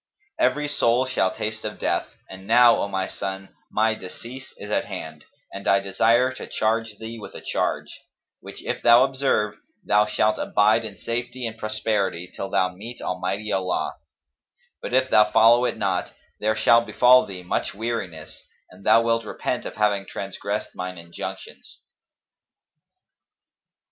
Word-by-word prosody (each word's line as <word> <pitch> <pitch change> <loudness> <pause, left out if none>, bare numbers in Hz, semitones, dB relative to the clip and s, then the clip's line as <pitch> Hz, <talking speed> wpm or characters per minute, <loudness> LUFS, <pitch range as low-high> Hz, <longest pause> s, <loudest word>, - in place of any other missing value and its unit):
Every 150 - +2
soul 125 -3 +2
shall 130 -7 +1
taste 110 +2 -4
of 105 0 -5
death;[FN#258] - - -2 0.2
and 95 +1 -11
now, 120 0 +6
O - - -1
my 95 -1 -2
son, 95 0 -6 0.2
my 110 +1 +2
decease 115 +7 -10
is - - -8
at - - +1
hand 80 -1 -8 0.3
and 100 -1 -7
I 100 - +5
desire 115 +6 +2
to - - -8
charge 110 -1 -1
thee 115 +1 -7
with - - -10
a - - -8
charge, - - -2 0.4
which - - -11
if - - -3
thou 120 +2 +7
observe, 130 -6 0 0.3
thou 105 +1 +3
shalt 105 0 +1
abide 110 +2 +3
in 105 -2 -8
safety 120 +5 -4
and 115 -1 -4
prosperity, 105 -5 -2
till 95 - -4
thou 95 - +2
meet 115 +6 -9
Almighty 95 +4 -3
Allah; 95 -1 -1 0.9
but - - -5
if 130 0 +3
thou 105 0 +6
follow 115 +3 +5
it - - -1
not, 95 -4 -1 0.3
there 110 +1 +1
shall 115 +2 +5
befal 125 +2 +5
thee 95 -2 -8
much 90 - -2
weariness 100 -8 -5 0.3
and 95 +2 -16
thou 115 +3 +5
wilt 115 0 +1
repent 105 - -3
of - - -8
having 100 -2 +1
transgressed 100 +2 -4
mine 90 0 -5
injunctions." 85 0 -9
110 Hz, 155 wpm, -24 LUFS, 95-115 Hz, 0.9 s, thou